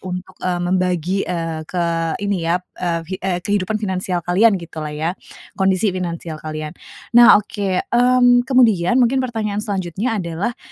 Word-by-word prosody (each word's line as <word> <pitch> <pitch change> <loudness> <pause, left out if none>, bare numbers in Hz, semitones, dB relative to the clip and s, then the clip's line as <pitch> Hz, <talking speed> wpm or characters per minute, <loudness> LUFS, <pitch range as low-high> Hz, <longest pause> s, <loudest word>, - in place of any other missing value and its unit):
untuk, 185 0 -6
eee, 180 -1 -1
membagi, 180 0 0
eee, 165 -2 -3
ke 175 -2 -1 0.4
ini 200 -1 0
ya, 170 - +3 0.2
eee, 170 -2 -1
hi 185 - -5
eee, 185 -2 -1
kehidupan 205 +1 0
finansial 185 -4 -2
kalian 195 +4 +4
gitulah 160 -3 -7
ya, 155 +3 -2 0.4
kondisi 190 +1 +1
finansial 170 -3 -5
kalian. 155 -1 -5 0.4
Nah, 240 0 +8
oke, 200 -2 -2
mmm, 245 0 +5
kemudian 235 -6 +3
mungkin 260 +1 +3
pertanyaan 220 -5 -2
selanjutnya 205 +2 -2
adalah, 180 +5 -3
185 Hz, 145 wpm, -19 LUFS, 175-215 Hz, 0.4 s, Nah